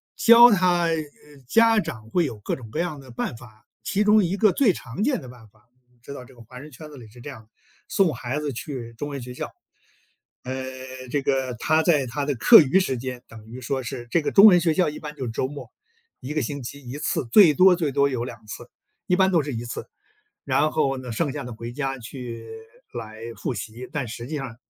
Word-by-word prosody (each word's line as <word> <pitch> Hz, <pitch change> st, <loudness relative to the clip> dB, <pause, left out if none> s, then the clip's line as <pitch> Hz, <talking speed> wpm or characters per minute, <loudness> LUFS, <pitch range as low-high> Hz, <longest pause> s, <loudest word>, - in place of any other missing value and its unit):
教 235 Hz, +1 st, +8 dB
他， 180 Hz, -3 st, +3 dB
呃， 165 Hz, -1 st, +1 dB, 0.5 s
家 225 Hz, -, +4 dB
长 110 Hz, -, -8 dB
会 175 Hz, -2 st, +2 dB
有 115 Hz, -7 st, -6 dB
各 -, -, -3 dB
种 120 Hz, -4 st, -11 dB
各 155 Hz, -, -4 dB
样 170 Hz, -4 st, -2 dB
的 130 Hz, -2 st, -13 dB
办 120 Hz, -, -4 dB
法， 110 Hz, -2 st, -16 dB, 0.2 s
其 205 Hz, +2 st, 0 dB
中 210 Hz, 0 st, +5 dB
一 185 Hz, +3 st, -1 dB
个 215 Hz, -1 st, +4 dB
最 250 Hz, -8 st, +3 dB
常 160 Hz, -, -5 dB
见 260 Hz, -3 st, +1 dB
的 130 Hz, -, -11 dB
办 120 Hz, -3 st, -14 dB
法 110 Hz, +3 st, -30 dB, 0.3 s
知 140 Hz, -, -9 dB
道 135 Hz, -, -9 dB
这 125 Hz, -, -17 dB
个 120 Hz, -, -16 dB
华 125 Hz, +3 st, -12 dB
人 150 Hz, +3 st, -11 dB
圈 155 Hz, +4 st, -11 dB
子 145 Hz, -, -12 dB
里 120 Hz, -3 st, -12 dB
是 120 Hz, +3 st, -16 dB
这 135 Hz, -, -9 dB
样 130 Hz, -5 st, -10 dB
的， 110 Hz, -, -31 dB, 0.4 s
送 185 Hz, -6 st, +2 dB
孩 130 Hz, +4 st, -4 dB
子 145 Hz, -3 st, -3 dB
去 120 Hz, -2 st, -7 dB
中 145 Hz, +6 st, -6 dB
文 140 Hz, -2 st, -6 dB
学 125 Hz, +1 st, -8 dB
校。 -, -, -6 dB, 0.9 s
呃， 130 Hz, +1 st, -5 dB, 0.6 s
这 145 Hz, -, 0 dB
个 130 Hz, -2 st, -1 dB
他 155 Hz, +7 st, +2 dB
在 150 Hz, -6 st, +3 dB
他 130 Hz, +4 st, -4 dB
的 145 Hz, -1 st, -1 dB
课 225 Hz, -, +8 dB
余 150 Hz, +5 st, +3 dB
时 135 Hz, -9 st, -1 dB
间， 125 Hz, 0 st, -6 dB
等 110 Hz, -1 st, -13 dB
于 120 Hz, +3 st, -9 dB
说 130 Hz, +1 st, -3 dB
是 120 Hz, 0 st, -7 dB
这 170 Hz, -, +2 dB
个 -, -, -2 dB
中 200 Hz, -, +8 dB
文 180 Hz, -5 st, +8 dB
学 165 Hz, -1 st, +2 dB
校， 180 Hz, -1 st, +2 dB
一 150 Hz, -, -8 dB
般 150 Hz, -1 st, -7 dB
就 135 Hz, -3 st, -5 dB
是 115 Hz, -, -4 dB
周 120 Hz, +3 st, -2 dB
末， 145 Hz, +1 st, -9 dB, 0.5 s
1 135 Hz, +4 st, -5 dB
个 155 Hz, -, +1 dB
星 140 Hz, +3 st, -4 dB
期 140 Hz, +4 st, -8 dB
1 130 Hz, +4 st, -6 dB
次， 140 Hz, -, -1 dB
最 180 Hz, -8 st, +8 dB
多 185 Hz, +5 st, +6 dB
最 160 Hz, -5 st, -1 dB
多 140 Hz, +1 st, +3 dB
有 130 Hz, -4 st, -3 dB
2 115 Hz, -3 st, -9 dB
次， 105 Hz, -, -9 dB, 0.4 s
一 180 Hz, -, +3 dB
般 190 Hz, 0 st, +4 dB
都 170 Hz, -3 st, +3 dB
是 145 Hz, -1 st, -5 dB
1 115 Hz, +1 st, -5 dB
次。 120 Hz, -, -7 dB, 0.5 s
然 155 Hz, -, +1 dB
后 135 Hz, -3 st, 0 dB
呢， 125 Hz, -2 st, -7 dB
剩 140 Hz, +5 st, -1 dB
下 145 Hz, -1 st, -5 dB
的 125 Hz, -1 st, -7 dB
回 115 Hz, +2 st, -8 dB
家 135 Hz, -1 st, -3 dB
去 115 Hz, -2 st, -8 dB, 0.4 s
来 110 Hz, -2 st, -8 dB, 0.2 s
复 125 Hz, -, -3 dB
习， 115 Hz, +3 st, -7 dB
但 145 Hz, -4 st, -3 dB
实 115 Hz, +1 st, -7 dB
际 150 Hz, +1 st, -4 dB
上 130 Hz, -4 st, -6 dB
135 Hz, 250 characters per minute, -24 LUFS, 120-160 Hz, 0.9 s, 教